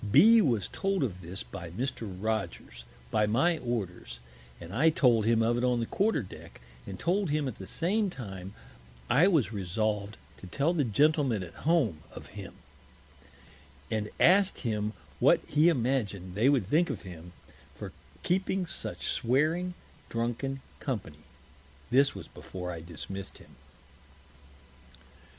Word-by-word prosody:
B 225 - +8
s - - +5
was 115 - +1
told 195 -4 0
of 95 -8 -3
this 90 -4 -6
by 80 +8 -8
Mr. 115 +2 -4
Rogers, 95 - -3 0.3
by 105 0 +3
my 160 +10 +2
Orders, 95 - -4 0.4
and 85 +2 -9
I 145 +9 +5
told 120 -8 +3
him 115 -1 +4
of 120 +1 +2
it - - -2
on 125 -1 +2
the 115 - 0
Quarter 205 - +1
Deck, 95 - -12 0.3
and 95 -2 -6
told 190 +1 +1
him 150 -1 0
at 125 - -6
the 95 - -7
same 200 +5 0
time 95 - -8 0.6
I 150 +9 +6
was 155 - +2
resolv'd 105 +2 -2 0.2
to 95 - -11
tell 145 - +1
the 155 -4 +2
Gentlemen 135 - +2
at 85 - -10 0.2
Home 130 - +3 0.2
of; - - -10 1.6
and 105 -1 -1
ask'd 195 +2 +5
him 105 -2 -1 0.3
what - - +4
he 155 +3 +4
imagin'd 115 - -1
they 110 +8 +3
would 135 -8 +3
think 165 - +3
of - - -4
him 90 -2 -10 0.4
for - - -7 0.3
keeping 190 +1 0
such - - -6
swearing 160 +9 +1 0.3
drunken 120 +4 -2 0.2
Company. 105 - -4 0.7
This 135 +2 +4
was - - -8
before 90 -1 -7
I 85 - -6
dismiss'd 90 +4 -8
him. - - -17
115 Hz, 145 wpm, -29 LUFS, 95-150 Hz, 1.6 s, B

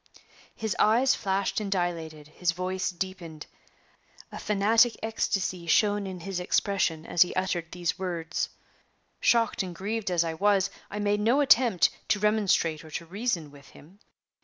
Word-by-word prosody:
His 220 -2 -3
eyes 240 +5 +4
flashed 195 +1 -1
and 205 -2 -4
dilated 165 -5 -3
his 170 +2 -1
voice 185 +1 -2
deepened 175 -4 -6 0.9
a - - -7
fanatic 220 +3 +3
ecstasy 190 -5 -2
shone 205 +3 +2
in 185 -2 -7
his 195 0 -4
expression 180 -3 0
as 170 - 0
he 180 - +4
uttered 175 -3 -2
these 175 0 -2
words. 170 -3 -3 0.7
Shocked 230 -2 +2
and 180 -2 -5
grieved 210 +3 -3
as 175 -2 +2
I 165 -1 -3
was, 200 +2 +2 0.2
I 205 - -6
made 205 0 +1
no 235 +7 +3
attempt 245 -9 +4 0.2
to 210 - +2
remonstrate 200 -7 +1
or 160 - -12
to 165 - -5
reason 180 -4 -3
with 140 0 -16
him. 180 +7 -18
190 Hz, 155 wpm, -27 LUFS, 170-210 Hz, 0.9 s, eyes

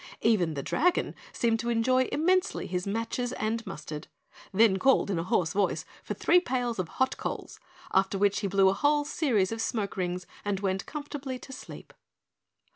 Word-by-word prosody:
Even 185 -8 +2
the 140 - -3
Dragon 350 +4 +1 0.2
seemed 230 -1 +1
to 235 - -2
enjoy 255 +3 +3
immensely 370 +5 +1
his 180 +1 -3
matches 230 +4 -2
and 225 +1 -1
mustard, 155 -4 -6 0.4
then 205 -1 +5
called 265 -3 +3
in 175 - 0
a - - -1
hoarse 175 -1 +1
voice 200 -1 0 0.2
for - - -5
three 355 - +5
pails 245 - -2
of 180 - -1
hot 260 0 +1
coals, - - -5 0.3
after 195 +1 +2
which 200 0 +2
he 205 - -1
blew 195 0 +4
a - - +2
whole 290 +8 +2
series 240 - +1
of 225 0 -3
smoke 215 -3 -2
rings 180 -1 -2 0.2
and 205 -2 -1
went 195 -1 -1
comfortably 285 -3 -5
to 265 - -11
sleep. 255 - -10
225 Hz, 180 wpm, -28 LUFS, 190-260 Hz, 0.4 s, then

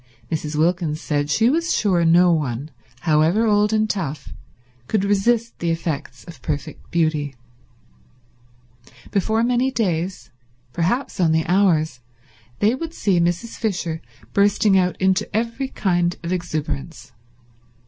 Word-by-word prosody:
Mrs. 155 -1 -2
Wilkins 160 -1 +1
said 145 -3 -1
she 220 +9 +3
was 330 +6 +1
sure 185 -5 +2
no 175 +2 +5
one, 145 -2 -2 0.3
however 160 +7 +3
old 210 -1 +3
and 215 0 +2
tough, 165 -9 -4 0.5
could 205 +4 +1
resist 225 +4 +1
the 170 - -1
effects 155 -6 -3
of 165 -7 -12
perfect 150 +4 -5
beauty. 155 -4 0 1.8
Before 220 +3 +1
many 250 +2 +2
days, 180 - -2 0.4
perhaps 190 - -1
only 160 -2 +2
hours, 170 -7 +2 0.6
they 215 +3 +3
would 325 +5 -5
see 190 -4 +2
Mrs. 175 +7 -1
Fisher 175 -7 -2 0.3
bursting 205 0 +3
out 180 -1 +2
into 190 0 +1
every 235 +4 -2
kind 175 -7 0
of 170 +2 -2
exuberance. 155 -4 -4
175 Hz, 125 wpm, -21 LUFS, 160-210 Hz, 1.8 s, no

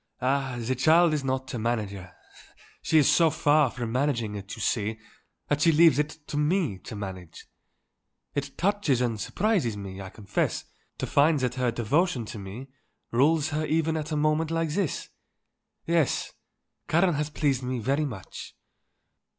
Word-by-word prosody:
"Ah, 135 0 0
the 120 +2 -1
child 160 +5 +4
is 150 -2 -1
not 130 -1 -2
a 120 - -3
manager. 105 -5 -3 0.7
She 160 - +2
is 150 - +5
so 155 +3 +5
far 150 -3 +3
from 120 -1 -5
managing 125 -4 0
it, 100 -1 -7
you - - -12
see, 110 0 -1 0.5
that 145 0 0
she 165 - +5
leaves 160 -2 +5
it 150 +1 -1
to 145 - -5
me 150 - +1
to - - -7
manage. 95 -5 -8 0.9
It 140 -1 -4
touches 195 - +1
and 120 -3 -1
surprises 180 - 0
me, 100 -1 -7
I 95 - -7
confess, 100 0 -2 0.3
to - - -2
find 150 +1 +3
that 125 -1 0
her 125 -1 0
devotion 120 - 0
to 105 - -7
me 105 +8 -8 0.4
rules 150 +5 +3
her 155 0 -1
even 160 0 +1
at 155 0 -4
a 150 - 0
moment 155 +1 +1
like 165 -1 0
this. 170 0 -2 0.8
Yes; 165 -4 +1 0.6
Karen 175 +2 +3
has 150 0 -1
pleased 145 -4 0
me 130 0 -3
very 135 +6 0
much." 110 -10 -8
140 Hz, 165 wpm, -27 LUFS, 115-155 Hz, 0.9 s, is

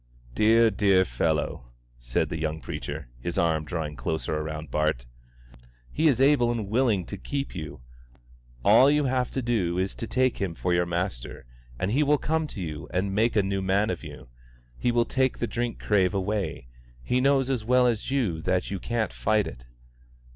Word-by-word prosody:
"Dear, 115 - +4
dear 95 -2 +3
fellow," 75 -7 -1 0.3
said - - -1
the 80 - -4
young 80 0 -2
preacher, - - -6
his 85 +8 -4
arm 80 -2 +1
drawing 80 -3 -4
closer 75 +4 -2
round 80 0 -6
Bart, 75 -6 0 0.9
"He 160 +2 +2
is 135 -5 +3
able 135 -3 +4
and 115 -4 -2
willing 110 -5 +2
to 100 - -7
keep 140 +8 -4
you; 80 -7 -7 0.8
all 115 +7 +7
you 150 0 +3
have 130 -1 0
to 130 - -2
do 100 -8 0
is 95 +1 -1
to 115 - -6
take 130 +1 +1
Him 90 -4 -2
for 90 +2 -1
your 85 0 +2
Master, 85 -10 -4 0.3
and 90 +8 -1
He 135 +6 +2
will 150 0 +3
come 160 +2 -1
to 120 - -8
you 75 -3 -6
and 95 +2 -1
make 110 +4 +2
a 105 - +4
new 95 0 -1
man 100 +4 +1
of - - -5
you. - - -10 0.5
He 120 - 0
will 120 0 +2
take 130 +1 0
the - - -1
drink 120 0 -3
crave 100 -2 +1
away. 100 -7 -2 0.4
He 125 - +1
knows 135 -1 +3
as 125 -5 -1
well 125 +2 +4
as 120 -2 0
you 120 -12 0
do - - -7
that 90 +3 -1
you 100 - -3
can't 115 +3 -2
fight 110 -2 +1
it." - - -9
100 Hz, 190 wpm, -26 LUFS, 85-120 Hz, 0.9 s, all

